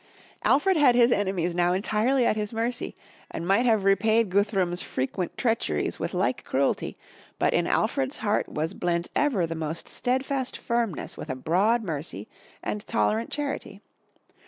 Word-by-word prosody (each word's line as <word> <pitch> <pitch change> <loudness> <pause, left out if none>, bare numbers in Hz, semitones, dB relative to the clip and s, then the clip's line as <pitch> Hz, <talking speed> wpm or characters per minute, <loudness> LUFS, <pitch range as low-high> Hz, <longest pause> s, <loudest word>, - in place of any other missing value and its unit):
Alfred 355 +6 +3
had 275 -5 +5
his 240 0 +5
enemies 190 -5 0
now 175 0 +2
entirely 220 +7 +1
at - - +3
his 210 -1 -3
mercy 230 +2 -2 0.3
and 170 - -5
might 215 +6 +3
have 220 -4 +3
repaid 215 +1 +3
Guthrum's 190 -3 +1
frequent 150 +7 -3
treacheries 230 -3 0
with - - -3
like - - 0
cruelty, - - 0 0.4
but - - +2
in - - +2
Alfred's 270 0 0
heart 210 -1 0
was 160 +4 -2
blent 170 -1 -1
ever 250 -12 +2
the 165 - -4
most 160 0 -4
steadfast 260 +1 -1
firmness 235 - -2
with - - -7
a 130 - -2
broad 195 - +2
mercy 150 - -5 0.4
and 105 -1 -2
tolerant 105 +2 +1
charity. 290 -2 -4
205 Hz, 155 wpm, -26 LUFS, 170-240 Hz, 0.4 s, had